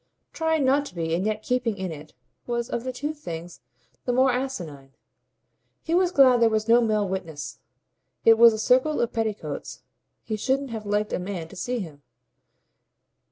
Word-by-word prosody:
Trying 320 -3 +1
not 280 +2 +2
to - - -13
be 165 -1 -2
and 180 +5 0
yet 215 0 -2
keeping 245 -4 -1
in 190 -2 -4
it 155 -2 -10 0.3
was 235 -1 -2
of 235 -1 -2
the 255 - -3
two 290 +5 -4
things 175 - -8 0.4
the 245 - +1
more 260 +2 +4
asinine. 170 - -5 0.9
He 325 - -2
was 360 0 +3
glad 255 -6 +5
there 230 - +6
was 215 0 -1
no 235 +1 +6
male 215 -3 +1
witness; 165 -6 -5 0.7
it 225 0 +7
was 235 0 +9
a 220 - -3
circle 255 +7 +2
of 235 - 0
petticoats; 220 -2 -4 0.4
he 220 - -3
shouldn't 270 +3 -1
have 220 -2 -6
liked 210 +1 0
a - - 0
man 180 -3 -5
to - - -12
see 245 +5 -2
him. 150 -6 -9
225 Hz, 180 wpm, -25 LUFS, 190-255 Hz, 0.9 s, was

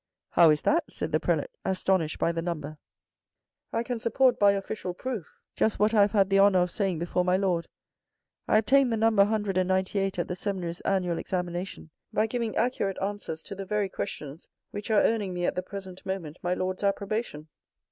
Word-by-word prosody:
"How 170 -2 +6
is 150 -1 +2
that?" 335 +3 +2
said - - -4
the - - +2
Prelate - - 0
astonished 185 -4 0
by 170 - +1
the 165 0 -2
number." 155 -3 -5 0.5
" - - -63
I 230 - 0
can 240 -1 -3
support 245 +3 +2
by 200 -1 +6
official 195 -2 -4
proof 235 -6 -5 0.2
just 220 - +1
what 210 +2 +2
I 210 - +5
have 200 +1 +3
had 195 -2 +3
the 195 - +5
honour 200 -1 +6
of 180 -1 +2
saying 195 -5 -1
before 175 +2 0
my 180 +1 +2
lord. 180 -4 0 0.8
I - - +4
obtained 260 +4 +4
the 225 - +1
number 220 -2 +4
198 195 -2 +1
at 175 - -1
the 180 - -3
seminary's 180 -3 -3
annual 180 -3 0
examination 180 -2 -4 0.2
by 215 - +2
giving 230 -1 -2
accurate 220 -5 0
answers 195 -5 -4
to - - -7
the 195 0 -6
very 210 -1 0
questions 150 -3 -6 0.2
which 205 +2 -6
are 215 -2 +4
earning 205 -5 0
me 175 0 -1
at - - +1
the 180 - -2
present 190 -1 -9
moment 180 -5 -5
my 175 +1 0
lord's 185 +2 -3
approbation. 200 -5 -2
195 Hz, 195 wpm, -27 LUFS, 180-210 Hz, 0.8 s, How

